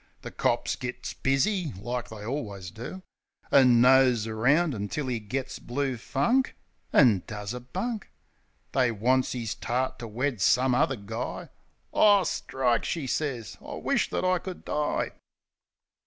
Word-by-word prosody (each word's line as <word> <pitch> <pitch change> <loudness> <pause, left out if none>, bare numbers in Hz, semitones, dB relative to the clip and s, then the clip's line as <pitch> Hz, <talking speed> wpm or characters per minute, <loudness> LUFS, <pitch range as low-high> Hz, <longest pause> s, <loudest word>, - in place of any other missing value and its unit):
The - - -7
cops - - 0
gits - - -5
busy, 165 +5 0
like 120 +6 -4
they 110 -1 -9
allwiz 105 -9 -5
do. 155 - -7 0.5
An' 125 -4 +6
nose 125 -3 +5
around 135 +9 +2
until 125 +6 -3
'e 120 - -1
gits 130 +5 -4
blue 135 +1 -2
funk 145 - +1 0.4
An' 115 -9 +5
does 105 0 -5
a 125 - -5
bunk. 210 - -4 0.6
They 130 -3 +2
wants 125 +5 +1
'is 115 -3 -3
tart 130 +2 -2
to 115 - -6
wed 120 0 -2
some 125 +5 +4
other 140 +2 +2
guy. 110 +1 -5 0.4
"Ah, 205 -2 +6
strike!" 125 -7 0
she 160 -5 -2
sez. 125 -6 -3
"I - - -7
wish - - 0
that - - -1
I 185 -1 +3
could 185 0 -8
die!" 150 0 -1
130 Hz, 145 wpm, -27 LUFS, 115-145 Hz, 0.6 s, An